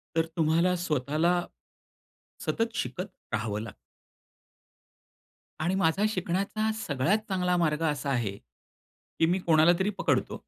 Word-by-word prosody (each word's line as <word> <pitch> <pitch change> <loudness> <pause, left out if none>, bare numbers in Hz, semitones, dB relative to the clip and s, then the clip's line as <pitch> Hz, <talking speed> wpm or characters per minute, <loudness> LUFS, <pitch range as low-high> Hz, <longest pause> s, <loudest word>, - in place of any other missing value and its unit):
तर 165 0 +3
तुम्हाला 165 +3 +3
स्वतःला, 165 +1 +1 1.0
सतत 230 0 -1
शिकत 180 - -3 0.3
राहावं 105 -1 -1
लागतं. 110 -3 -8 1.8
आणि 175 +4 0
माझा 190 +1 +2
शिकण्याचा 200 +3 -1 0.2
सगळ्यात 145 +9 +2
चांगला 180 -2 +1
मार्ग 155 -2 +1
असा 145 -1 -3
आहे, 115 -7 -1
की 165 - -7
मी 180 +3 +1
कोणाला 165 -1 +5
तरी 190 +2 +1
पकडतो. - - 0
170 Hz, 115 wpm, -28 LUFS, 150-185 Hz, 1.8 s, कोणाला